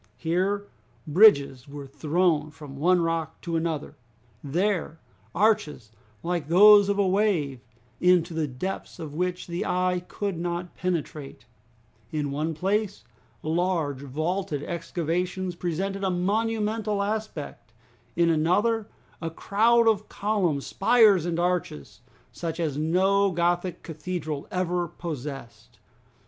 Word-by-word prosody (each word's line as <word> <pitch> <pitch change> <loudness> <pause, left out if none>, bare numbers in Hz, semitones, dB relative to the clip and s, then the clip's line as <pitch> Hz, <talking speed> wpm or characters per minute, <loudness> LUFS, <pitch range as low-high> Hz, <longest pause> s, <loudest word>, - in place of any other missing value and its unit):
Here, 190 +5 0 0.4
bridges 145 - +5
were 140 0 -8
thrown 155 +3 0
from 150 -2 -11
one 175 +5 +3
rock 165 -1 -2
to 170 -1 -3
another; 160 -3 -2 0.5
there, 170 +2 -1 0.4
arches 190 - +1 0.3
like 170 -4 -2
those 205 +4 +7
of 200 - +1
a 200 -1 +2
wave, 185 - +1 0.4
into 180 -1 +3
the 160 -2 -1
depths 145 +9 -5
of 160 -4 -7
which 180 +2 -2
the 175 +1 -3
eye 180 0 0
could 200 -5 -3
not 175 0 -3
penetrate; 155 -5 -4 0.7
in 150 -2 -2
one 155 +3 -2
place, 200 +4 -1 0.4
large 160 -4 0
vaulted 155 +3 -2
excavations 175 +2 -2
presented 190 +3 -3
a 190 - +1
monumental 210 +2 0
aspect; 200 - -5 0.4
in 170 0 +3
another, 205 +8 +1 0.3
a 165 - -2
crowd 225 +7 +3
of 215 -2 +2
columns, 190 -9 0
spires, 215 -8 +4
and 170 -1 -1
arches, 175 - -2 0.3
such 165 -1 -5
as 155 -5 -1
no 190 +6 +2
Gothic 175 0 -1
cathedral 160 -3 -5
ever 180 -1 -1
possessed. 145 -7 -8
175 Hz, 120 wpm, -26 LUFS, 155-195 Hz, 0.7 s, those